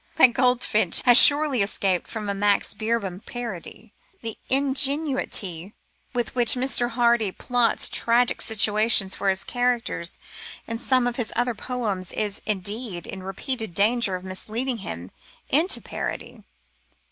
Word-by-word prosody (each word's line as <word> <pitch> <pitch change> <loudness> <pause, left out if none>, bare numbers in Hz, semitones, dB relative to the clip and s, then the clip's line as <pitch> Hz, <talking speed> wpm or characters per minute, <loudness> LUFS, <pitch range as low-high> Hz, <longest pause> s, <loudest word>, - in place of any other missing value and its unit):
That 255 -6 +6
goldfinch 245 -7 +2
has 245 -1 +6
surely 285 -2 +7
escaped 195 -2 0
from 215 -2 -6
a 200 - 0
Max 200 0 +1
Beerbohm 215 -3 -3
parody. 235 -8 -8 0.3
The 225 -1 -4
ingenuity 265 - 0 0.4
with 240 -3 -3
which 240 -1 +2
Mr. 250 -1 +1
Hardy 235 -3 +2
plots 245 +3 0
tragic 240 +1 +1
situations 215 -2 +2
for 200 - -1
his 190 0 0
characters 245 -8 -2 0.5
in 230 0 -5
some 255 0 +1
of 245 -1 -2
his 240 -4 -2
other 245 +1 0
poems 210 -6 -4
is, 210 -2 -2
indeed, 205 -1 -3
in 190 - -8
repeated 200 +1 -5
danger 210 -1 +2
of 180 - -7
misleading 225 +7 -4
him 90 - -8 0.4
into 330 +7 +1
parody. - - -6
230 Hz, 135 wpm, -24 LUFS, 200-245 Hz, 0.5 s, surely